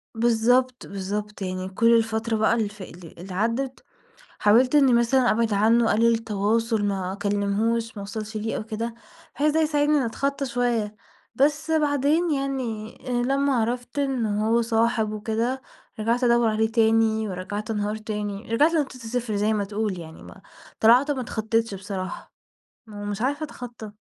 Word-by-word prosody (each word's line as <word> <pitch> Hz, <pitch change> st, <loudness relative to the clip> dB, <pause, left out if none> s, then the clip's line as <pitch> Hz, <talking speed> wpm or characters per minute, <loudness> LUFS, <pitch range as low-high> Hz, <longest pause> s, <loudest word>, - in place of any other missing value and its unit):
بالضبط، 240 Hz, +2 st, +2 dB
بالضبط، 205 Hz, +2 st, -5 dB
يعني 185 Hz, 0 st, -3 dB
كل 230 Hz, +5 st, +4 dB
الفترة 225 Hz, 0 st, -1 dB
بقى 220 Hz, +1 st, +3 dB
اللي 220 Hz, -3 st, 0 dB
فا 205 Hz, -2 st, -10 dB
اللي 170 Hz, -1 st, -13 dB
اللي 185 Hz, +2 st, -8 dB
عدِّت 235 Hz, +7 st, -2 dB, 0.6 s
حاولت 240 Hz, +7 st, +4 dB
إني 275 Hz, -4 st, +5 dB
مثلًا 240 Hz, +2 st, +3 dB
أبعد 225 Hz, -1 st, +1 dB
عنه، 225 Hz, +3 st, +3 dB
أقلل 230 Hz, +2 st, +4 dB
التواصل، 225 Hz, 0 st, 0 dB
ما 190 Hz, -2 st, -1 dB
أكلمهوش، 205 Hz, +3 st, -1 dB
ما -, -, -5 dB
أوصلش 215 Hz, +2 st, -5 dB
ليه 220 Hz, +1 st, -3 dB
أو -, -, -4 dB
كده، 225 Hz, +1 st, -4 dB, 0.4 s
بحيث 300 Hz, +2 st, +2 dB
ده 320 Hz, -, +2 dB
يساعدني 300 Hz, -1 st, +2 dB
إني 260 Hz, -, +1 dB
أتخطى 275 Hz, +4 st, -2 dB
شوية. 235 Hz, -4 st, -1 dB, 0.4 s
بس 295 Hz, +3 st, +1 dB
بعدين 300 Hz, +2 st, +2 dB
يعني 255 Hz, -6 st, -3 dB
لمّا 270 Hz, +3 st, +1 dB
عرفت 245 Hz, +4 st, -2 dB
إن 270 Hz, -4 st, 0 dB
هو 215 Hz, +3 st, +1 dB
صاحب 225 Hz, -1 st, +1 dB
وكده 225 Hz, +5 st, -2 dB, 0.4 s
رجعت 235 Hz, +3 st, 0 dB
أدوَّر 235 Hz, -1 st, +4 dB
عليه 220 Hz, +1 st, 0 dB
تاني 225 Hz, -1 st, +2 dB
ورجعت 205 Hz, +4 st, -4 dB
أنهار 210 Hz, 0 st, -1 dB
تاني، 210 Hz, 0 st, -5 dB
رجعت 300 Hz, +7 st, +4 dB
لنقطة 290 Hz, -5 st, 0 dB
الصفر 235 Hz, -2 st, -3 dB
زي 210 Hz, +2 st, +1 dB
ما 210 Hz, -, 0 dB
تقول 205 Hz, -2 st, -3 dB
يعني 160 Hz, -1 st, -11 dB
ما -, -, -13 dB, 0.4 s
طلعت 250 Hz, +6 st, +5 dB
ما 265 Hz, -, -2 dB
أتخطتش 225 Hz, -2 st, -1 dB
بصراحة، 190 Hz, -1 st, -6 dB, 0.5 s
ما 210 Hz, -2 st, -9 dB
هو 205 Hz, -, -5 dB
مش 205 Hz, 0 st, -4 dB
عارفة 285 Hz, +5 st, -1 dB
أتخطى. 235 Hz, -7 st, -9 dB
225 Hz, 160 wpm, -24 LUFS, 210-250 Hz, 0.6 s, إني